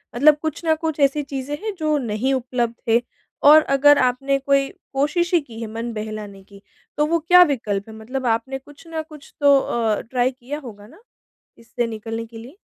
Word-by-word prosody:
मतलब 295 +5 +6
कुछ 315 +1 -4
ना 320 - +4
कुछ 315 -2 -2
ऐसी 280 +1 +2
चीज़ें 275 +1 -5
हैं 435 -1 -3
जो 305 -1 +1
नहीं 245 +1 -1
उपलब्ध 245 -2 -1
है 230 +1 +4 0.4
और 305 +2 +9 0.2
अगर 290 +1 +6
आपने 255 +2 +1
कोई 275 0 +1 0.2
कोशिश 345 +6 0
ही 345 - +6
की 230 -5 -12
है 225 - -4
मन 230 +1 -4
बहलाने 215 -2 -7
की, 200 0 -17 0.4
तो 300 - +3
वो 335 +2 +1
क्या 355 +3 +6
विकल्प 225 - -2
हैं? 220 - -10
मतलब 250 +4 -5
आपने 240 +3 -1
कुछ 290 +4 -17
न 325 -1 -4
कुछ 300 -3 -14
तो 285 -1 +6
अ, 225 -5 -1
ट्राई 250 +2 0
किया 265 +3 -7
होगा 210 -7 -11
ना 315 - -18 0.6
इससे 230 +1 -3
निकलने 225 +1 -5
के 225 0 -13
लिए। 250 +10 -12
265 Hz, 200 wpm, -21 LUFS, 230-290 Hz, 0.6 s, और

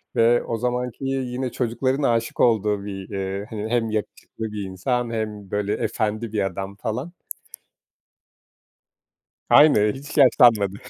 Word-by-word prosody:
ve 115 +1 +4
o 115 - -3
zamanki, 125 +2 -3
yine 130 -1 -2
çocukların 130 +4 -1
aşık 115 -2 0
olduğu 105 -3 +2
bir, 95 -2 -7
eee, 95 0 -4
hani 110 -1 -5
hem 115 -1 0
yakışıklı 110 +1 -5
bir 105 -1 -4
insan, 115 +6 -2
hem 105 -3 -5
böyle 105 0 -1
efendi 110 +1 -2
bir 105 -2 +1
adam 95 +1 -5
falan. 120 +10 -4 2.4
Aynı, 105 -9 +6
hiç 140 +3 -8
yaşlanmadı. 120 -8 +5
110 Hz, 125 wpm, -23 LUFS, 105-125 Hz, 2.4 s, Aynı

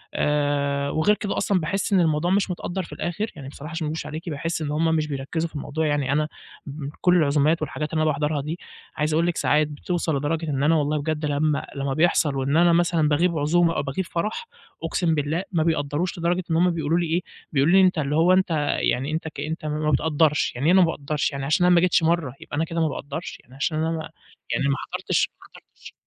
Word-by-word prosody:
آآ 140 -1 0
وغير 180 +9 +2
كده 205 0 -3
أصلًا 195 -3 +1
باحس 190 +5 -1
إن 190 - +5
الموضوع 165 +1 +2
مش 195 -1 +2
متقدّر 180 +1 -4
في - - -10
الآخر، 205 +6 -3
يعني 140 -4 -9
بصراحة 150 +2 -9
عشان 160 -1 -3
ما - - -2
اكدبش 160 - -4
عليكِ 160 +3 -6
باحس 165 +2 -3
إن 150 -2 -2
هُم 160 +2 +1
مش 155 -1 0
بيركّزوا 150 +4 -3
في - - -18
الموضوع 155 +2 -2
يعني 145 -3 0
أنا 150 +1 +1 0.4
من 140 0 -6
كلّ 180 -1 +4
العزومات 155 +1 +2
والحاجات 150 +1 -4
اللي 160 - +1
أنا - - +2
باحضرها 150 0 -1
دي، 155 +5 -5 0.4
عايز 150 +1 0
اقول 165 +2 +2
لِك 175 - -1
ساعات 150 0 +2
بتوصل 160 +1 -2
لدرجة 155 +3 -2
إن 140 -1 -1
أنا 160 +3 +4
والله 150 0 +1
بجد 155 0 -2
لمّا 145 0 0
لمّا 140 -1 -2
بيحصل 155 -2 +2
وإن 135 +3 +1
أنا 170 0 +5
مثلًا 170 -2 +2
باغيب 165 +3 +2
عزومة 165 +3 +2
أو - - +1
باغيب 140 +7 -3
فرح، 210 - -3 0.4
أقسم 170 -3 0
بالله 150 +4 -1
ما 165 -4 +1
بيقدّروش، 160 +2 -1
لدرجة 175 +2 0
إن - - +2
هُم 175 +2 +4
بيقولوا 165 0 0
لي 175 - 0
إيه، 165 +3 0 0.3
بيقولوا 145 +4 +3
لي 195 - +7
أنت 185 -2 +3
اللي 145 -1 0
هو 170 +3 +5
أنت 185 -1 +2 0.3
يعني 135 +4 0
أنت 160 +1 -2
كأنتم 155 +1 -5
ما 150 0 0
بتقدّرش، 150 0 +2
يعني 125 +4 -3
إيه - - +6
أنا 190 - +7
ما 175 - +5
باقدّرش 150 -1 -2
يعني 135 -1 -4
عشان 155 +5 +2
أنا 180 0 +5
ما 170 - +5
جيتش 180 -2 +3
مَرّة 160 -6 +1
يبقى - - -8
أنا 160 - +1
كده 165 0 -2
ما 160 - +3
باقدّرش! 150 +3 -6
يعني 125 - -18
عشان 155 +3 -1
أنا 160 0 -2 0.4
يعني 140 - +1
ما 140 - +2
حضرتش - - -1
ما - - -14
حضرتش - - -15
155 Hz, 230 wpm, -24 LUFS, 145-170 Hz, 0.4 s, لي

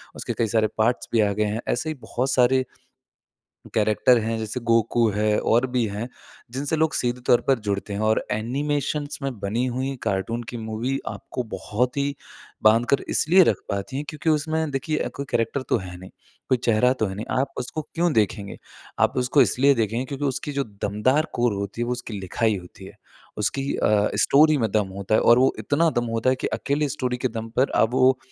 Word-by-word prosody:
उसके - - -4
कई 115 - +2
सारे 110 0 +2
पार्ट्स 115 +3 +1
भी 115 - +3
आ 105 - +2
गए 105 - 0
हैं। 115 - -3
ऐसे 155 +6 -1
ही 155 - -3
बहुत 130 +2 -2
सारे 130 +1 +3 1.1
कैरेक्टर 110 +3 +3
हैं, 115 0 -2
जैसे 110 +3 -4
गोकू 115 0 +3
है 105 0 +1
और 120 +3 +2
भी 120 -2 +2
हैं, 105 +4 -4 0.4
जिनसे 140 +4 -2
लोग 160 0 +1
सीधे 125 0 -1
तौर 120 - +5
पर 135 -3 +4
जुड़ते 100 0 -2
हैं, 100 - -3
और 110 0 +1
एनिमेशन्स 145 +6 -2
में 135 -5 -3
बनी 105 +5 -1
हुई 130 +2 -2
कार्टून 110 +3 -1
की - - -4
मूवी 115 +5 -2
आपको 125 - -5
बहुत 125 +5 -1
ही 140 0 0 0.5
बाँधकर 115 +5 +4
इसलिए 185 +5 +4
रख - - +2
पाती 100 +7 -3
है, - - -2
क्योंकि 155 +1 -1
उसमें 155 0 0
देखिए 150 +3 -1
अ, - - -2
कोई 140 - -4
कैरेक्टर 115 +4 0
तो - - +4
है 90 -2 -8
नहीं, 95 +1 -11 0.4
कोई 130 - +3
चेहरा 120 +2 +4
तो 120 -4 -1
है 95 - -5
नहीं, 105 - -5
आप 135 - -2
उसको 125 +5 -4
क्यों 170 -1 +1
देखेंगे? 105 -2 -1 0.4
आप - - +2
उसको 125 +3 +4
इसलिए 135 +5 +3
देखेंगे 115 +2 -1
क्योंकि 140 +2 -5
उसकी 140 +2 -3
जो 140 0 -1 0.2
दमदार 130 +10 +1
कोर 120 -1 +2
होती 100 +2 -5
है, 120 - -1
वो 125 - -1
उसकी 120 -4 -5
लिखाई 105 +3 0
होती 90 -2 -11
है, - - -13 0.4
उसकी 135 +7 -1
अ, 105 -1 +2 0.2
स्टोरी 155 +2 +5
में 110 -4 0
दम 105 -3 +1
होता 100 +2 -1
है, - - +3
और 120 +1 +6
वो 130 +1 +4
इतना 160 +3 +2
दम 120 - -3
होता 115 +3 +2
है 130 - +1
कि - - -3
अकेले 145 +1 0
स्टोरी 130 -3 -2
के 130 - 0
दम 115 0 -5
पर 130 - +3
अब 115 - -3
वो 130 0 +4
120 Hz, 210 wpm, -24 LUFS, 110-135 Hz, 1.1 s, और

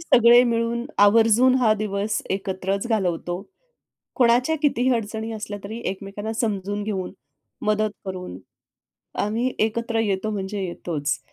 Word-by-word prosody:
सगळे 240 -6 +6
मिळून 235 0 0
आवर्जून 225 +4 +5
हा 230 -4 +4
दिवस 205 0 -2
एकत्रच 195 +1 -2
घालवतो. 180 -3 -1 0.7
कोणाच्या 250 +5 +3
कितीही 260 -4 +2
अडचणी 220 0 -4
असल्या 210 -1 -6
तरी 220 +3 -6
एकमेकांना 200 +3 -5
समजून 205 -3 -2
घेऊन, 195 -3 -3 0.5
मदत 215 0 +2 0.2
करून, 180 - -6 0.8
आम्ही 225 +5 0
एकत्र 230 +1 0
येतो 210 0 -1
म्हणजे 200 0 -3
येतोच. 160 -5 -3
215 Hz, 115 wpm, -23 LUFS, 195-230 Hz, 0.8 s, सगळे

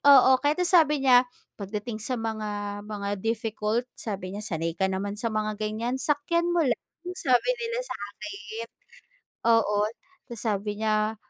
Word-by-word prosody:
oo. 265 0 +7
Kahit 300 +6 +2
na 355 - +1
sabi 300 -6 +4
niya, 250 -1 +6 0.3
"Pagdating 210 +3 -4
sa 250 +4 -2
mga 210 -3 -3
mga 200 -1 -4
difficult," 225 +1 -1 0.2
sabi 195 -4 -4
niya, 205 - -5
"Sanay 165 -3 -1
ka 190 -1 +2
naman 200 +2 -3
sa 230 - 0
mga 215 -1 -2
ganyan, 225 +4 -2
sakyan 325 +4 +1
mo 335 - +4
lang." 250 -5 +1 0.4
Sabi 255 - +3
nila 470 +1 -2
sa - - -5 0.2
akin. 210 +2 -6 0.8
Oo. 210 -2 +4 0.4
Ta's 235 -3 -7
sabi 210 -1 -1
niya, 215 0 +2
220 Hz, 155 wpm, -27 LUFS, 205-255 Hz, 0.8 s, oo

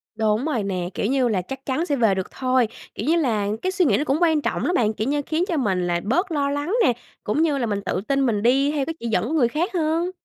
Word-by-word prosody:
Đúng 220 +3 +1
rồi 280 -9 -1
nè. 185 -3 -2
Kiểu - - -2
như 260 +2 +2
là, 200 -5 0
chắc 265 +9 -8
chắn 285 +5 -1
sẽ 290 - 0
về 225 -7 +3
được 190 -1 -4
thôi. 255 -2 +1 0.3
Kiểu - - -4
như 325 - +4
là, 230 -11 +1
cái 370 - 0
suy 375 -2 +2
nghĩ - - +3
nó - - 0
cũng 280 -1 +1
quan 320 -3 +3
trọng - - -2
lắm 355 - +1
bạn. 220 -2 +2
Kiểu 215 +2 -3
như, 290 +1 +1
khiến 320 +2 0
cho 335 - -1
mình 190 -9 0
là 175 0 0
bớt 345 - 0
lo 285 -3 0
lắng 290 +6 -2
nè, 250 - +4 0.3
cũng 215 +9 0
như 310 -3 +2
là 250 - 0
mình 205 -3 -2
tự 185 - -1
tin 275 -1 +2
mình 210 -4 0
đi 270 +4 +3
theo 290 -3 -1
cái 325 - -3
chỉ 235 - -4
dẫn 225 - +1
của 300 - -3
người 280 -7 +3
khác 325 - -2
hơn. 335 +1 0
270 Hz, 295 wpm, -23 LUFS, 215-310 Hz, 0.3 s, như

